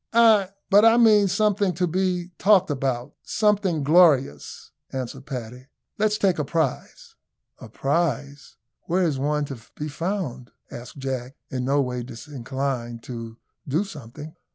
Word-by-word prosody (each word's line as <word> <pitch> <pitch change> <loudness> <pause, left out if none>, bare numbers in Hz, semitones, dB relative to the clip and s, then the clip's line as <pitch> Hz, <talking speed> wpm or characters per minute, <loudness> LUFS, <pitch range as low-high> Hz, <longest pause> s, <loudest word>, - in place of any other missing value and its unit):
"Ay, 220 -4 +5 0.2
but 205 +2 +7
I 225 +1 +6
mean 215 -4 +6
something 200 -1 +1
to 180 +2 +1
be 180 0 -1
talked 190 -4 +4
about 130 -3 -2
something 200 -7 +1
glorious," 145 - +3 0.2
answered 130 +1 -6
Paddy. 125 -1 -7 0.3
"Let's 210 0 +2
take 190 -6 +1
a - - +1
prize." 155 -2 -3 0.5
"A - - -11
prize! 145 -2 -2 0.3
Where 180 +2 +2
is 150 -6 0
one 150 +1 0
to 135 -4 -7 0.2
be 150 +1 -5
found?" 155 -7 -4 0.2
asked 120 +3 -9
Jack, 130 -1 -4 0.2
in 130 -2 -2
no 140 +2 +2
way 125 -1 -3
disinclined 125 -1 -5
to 115 -2 -7 0.3
do 155 +8 +1
something. 150 - -10
145 Hz, 140 wpm, -24 LUFS, 130-185 Hz, 0.5 s, but